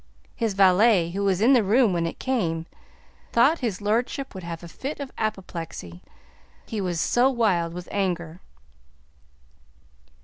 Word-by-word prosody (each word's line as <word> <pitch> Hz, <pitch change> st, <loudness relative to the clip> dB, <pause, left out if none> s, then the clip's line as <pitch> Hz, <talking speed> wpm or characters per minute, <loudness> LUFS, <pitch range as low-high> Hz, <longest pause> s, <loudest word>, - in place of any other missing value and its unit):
His 225 Hz, -4 st, -1 dB
valet, 190 Hz, -2 st, +4 dB
who 200 Hz, +3 st, -2 dB
was 195 Hz, -1 st, +1 dB
in 245 Hz, +5 st, +5 dB
the 245 Hz, -4 st, +5 dB
room 215 Hz, +1 st, +3 dB
when 170 Hz, -1 st, 0 dB
it -, -, -6 dB
came, 170 Hz, -11 st, -1 dB, 0.7 s
thought 275 Hz, +8 st, +4 dB
his 215 Hz, -6 st, -3 dB
lordship 240 Hz, +6 st, -1 dB
would 190 Hz, -, -7 dB
have 170 Hz, 0 st, -6 dB
a -, -, -8 dB
fit 275 Hz, -, -6 dB
of 280 Hz, -2 st, -6 dB
apoplexy, 170 Hz, -, -5 dB, 0.6 s
he 215 Hz, -2 st, -4 dB
was 175 Hz, -3 st, -2 dB
so 245 Hz, +9 st, +3 dB
wild 200 Hz, -10 st, +1 dB
with 180 Hz, -1 st, -7 dB
anger. 175 Hz, -4 st, -2 dB
195 Hz, 145 wpm, -25 LUFS, 170-235 Hz, 0.7 s, in